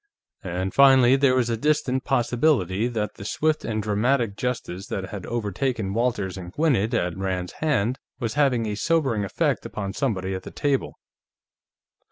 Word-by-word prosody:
And 95 Hz, +1 st, -3 dB
finally, 135 Hz, -2 st, +6 dB
there 135 Hz, -1 st, +3 dB
was 120 Hz, -2 st, +1 dB
a -, -, +1 dB
distinct 130 Hz, -1 st, 0 dB
possibility 120 Hz, -, +2 dB
that 110 Hz, -3 st, -3 dB
the -, -, -8 dB
swift 155 Hz, +9 st, 0 dB
and 110 Hz, -2 st, -2 dB
dramatic 110 Hz, +1 st, +1 dB
justice 100 Hz, -6 st, -4 dB
that 95 Hz, -1 st, -4 dB
had 100 Hz, -3 st, -7 dB
overtaken 115 Hz, -1 st, -2 dB
Walters 105 Hz, -5 st, -1 dB
and 90 Hz, -1 st, -8 dB
Gwinnett 120 Hz, -, +1 dB
at 90 Hz, -5 st, 0 dB
Rand's 95 Hz, -2 st, -3 dB
hands 130 Hz, -6 st, +1 dB, 0.2 s
was 115 Hz, -4 st, -2 dB
having 130 Hz, -5 st, +2 dB
a 105 Hz, -, -2 dB
sobering 130 Hz, -3 st, +1 dB
effect 100 Hz, -, 0 dB
upon 100 Hz, -2 st, -5 dB
somebody 95 Hz, -7 st, -1 dB
at 95 Hz, -, -4 dB
that -, -, -11 dB
table. 140 Hz, -2 st, -1 dB
115 Hz, 160 wpm, -24 LUFS, 100-130 Hz, 0.2 s, finally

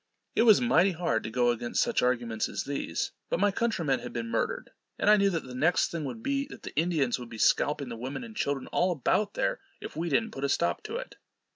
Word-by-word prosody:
It -, -, +3 dB
was 215 Hz, -, +8 dB
mighty 200 Hz, -6 st, +4 dB
hard 160 Hz, -10 st, 0 dB
to -, -, -3 dB
go 120 Hz, +1 st, +2 dB
against 120 Hz, 0 st, 0 dB
such 235 Hz, -2 st, 0 dB
arguments 120 Hz, -3 st, 0 dB
as -, -, -3 dB
these; 140 Hz, -12 st, -3 dB, 0.2 s
but -, -, 0 dB
my 205 Hz, +1 st, +3 dB
countrymen 170 Hz, -, 0 dB
had 120 Hz, 0 st, -7 dB
been 115 Hz, -1 st, -4 dB
murdered, -, -, -2 dB, 0.3 s
and 210 Hz, -, +4 dB
I -, -, +8 dB
knew 200 Hz, -1 st, +3 dB
that 165 Hz, -4 st, -2 dB
the 130 Hz, -, -9 dB
next 155 Hz, +8 st, +2 dB
thing 165 Hz, -3 st, -3 dB
would 225 Hz, +12 st, -6 dB
be, 275 Hz, 0 st, 0 dB
that -, -, -12 dB
the -, -, -8 dB
Indians 150 Hz, -6 st, +1 dB
would 120 Hz, -1 st, -8 dB
be 115 Hz, -, -8 dB
scalping 145 Hz, +4 st, +2 dB
the 115 Hz, -, -5 dB
women 130 Hz, -, -5 dB
and 225 Hz, -2 st, -10 dB
children 140 Hz, -6 st, -1 dB
all 180 Hz, +1 st, +2 dB
about 200 Hz, -, 0 dB
there, -, -, 0 dB, 0.2 s
if -, -, -8 dB
we 170 Hz, +2 st, -2 dB
didn't 225 Hz, +4 st, +1 dB
put 135 Hz, -, -7 dB
a 140 Hz, -, +1 dB
stop 170 Hz, -, +1 dB
to 435 Hz, +1 st, -5 dB
it. -, -, -6 dB
155 Hz, 245 wpm, -29 LUFS, 125-205 Hz, 0.3 s, was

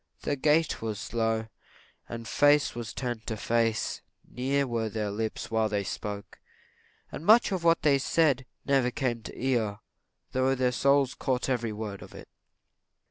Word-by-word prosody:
Their 145 Hz, -, 0 dB
gait 150 Hz, +3 st, +2 dB
was 110 Hz, -2 st, -3 dB
slow, 115 Hz, +1 st, -1 dB, 0.6 s
and 115 Hz, -1 st, -6 dB
face 145 Hz, 0 st, +4 dB
was 115 Hz, -1 st, -5 dB
turned 120 Hz, -3 st, -4 dB
to 110 Hz, -, -2 dB
face; 115 Hz, 0 st, 0 dB, 0.3 s
near 135 Hz, +3 st, 0 dB
were 115 Hz, -3 st, -2 dB
their 105 Hz, -1 st, -2 dB
lips 110 Hz, +2 st, -4 dB
while 110 Hz, -1 st, +2 dB
they 105 Hz, -1 st, -1 dB
spoke; 100 Hz, 0 st, -6 dB, 0.7 s
and -, -, -7 dB
much 220 Hz, +5 st, +6 dB
of 185 Hz, -3 st, -2 dB
what 165 Hz, 0 st, +3 dB
they 140 Hz, -2 st, +4 dB
said 135 Hz, -4 st, +2 dB, 0.2 s
never 135 Hz, -3 st, +3 dB
came 120 Hz, -2 st, -2 dB
to -, -, -8 dB
the 130 Hz, -, -6 dB
ear, 110 Hz, -6 st, +1 dB, 0.5 s
though 130 Hz, +1 st, +2 dB
their 125 Hz, -1 st, +1 dB
souls 140 Hz, +1 st, +3 dB
caught 130 Hz, -2 st, -1 dB
up -, -, +3 dB
every 120 Hz, -3 st, -2 dB
word 105 Hz, -2 st, -6 dB
of -, -, -12 dB
it. -, -, -11 dB
120 Hz, 170 wpm, -28 LUFS, 110-140 Hz, 0.7 s, much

